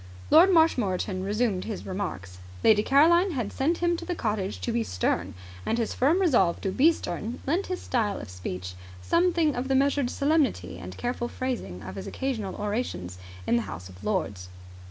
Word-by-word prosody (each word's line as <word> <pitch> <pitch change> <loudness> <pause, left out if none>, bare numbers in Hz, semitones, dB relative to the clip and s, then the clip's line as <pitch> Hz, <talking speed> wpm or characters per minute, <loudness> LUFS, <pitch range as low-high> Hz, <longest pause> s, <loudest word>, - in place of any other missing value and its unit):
Lord 340 +5 +8
Marshmoreton 205 - +2
resumed 205 -1 0
his 215 -3 -5
remarks. 100 - -5 0.2
Lady 210 -1 +6
Caroline 335 - +4
had 240 -7 -3
sent 320 +6 +1
him 345 0 +3
to 340 - -7
the 350 +1 -3
cottage 210 - -2
to - - -1
be 120 - +1
stern, 90 -1 -1 0.3
and 225 - 0
his 230 -2 -1
firm 300 +8 +3
resolve 240 - +3
to 195 - -1
be 290 - +5
stern 225 - -5
lent 340 +8 0
his 365 -1 -4
style 215 -5 0
of - - -8
speech 90 0 -6 0.3
something 335 -3 +2
of 245 +2 -2
the 270 - +2
measured 280 -1 +2
solemnity 270 - 0
and 90 0 -8
careful 240 0 -2
phrasing 240 - -4
of 95 - -7
his 95 - -6
occasional 230 -8 -3
orations 205 - -3 0.3
in 120 - +3
the - - +1
House 90 +3 -7
of 90 0 -14
Lords. 100 - -2
220 Hz, 180 wpm, -27 LUFS, -, 0.3 s, Lord